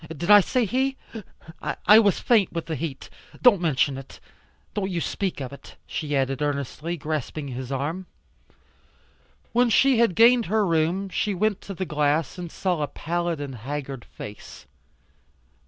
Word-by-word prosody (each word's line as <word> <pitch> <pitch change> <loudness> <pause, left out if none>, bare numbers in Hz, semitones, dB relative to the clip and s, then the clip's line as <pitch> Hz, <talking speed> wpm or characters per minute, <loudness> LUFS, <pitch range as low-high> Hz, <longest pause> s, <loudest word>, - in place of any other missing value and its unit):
Did 160 +5 -1
I 205 - +10
say 245 +5 +1
he? 265 +5 0 0.6
I 210 +1 +5
was 205 -5 +3
faint 220 -6 +3
with 165 -1 -4
the 165 - -4
heat. 140 -2 -5 0.3
Don't 225 -8 +5
mention 140 -4 +1
it. 135 - -13 0.5
Don't 195 -2 -2
you 175 -3 -2
speak 190 +1 -2
of 130 -1 -6
it," 140 - -13
she 150 -2 -3
added 135 0 0
earnestly, 145 +4 -2
grasping 150 -1 -4
his 130 +1 -6
arm. 155 +7 -3 1.4
When 245 +1 +3
she 260 +2 +4
had 230 -7 +3
gained 235 +1 +5
her 215 +2 +2
room 170 +3 0
she 205 +1 -1
went 210 +1 0
to 195 - -8
the 185 - -3
glass 150 +1 0
and 175 -2 -6
saw 180 -5 -1
a 145 - 0
pallid 170 +1 -3
and 140 -2 -5
haggard 135 +1 -6
face. 105 0 -11
170 Hz, 160 wpm, -24 LUFS, 145-200 Hz, 1.4 s, I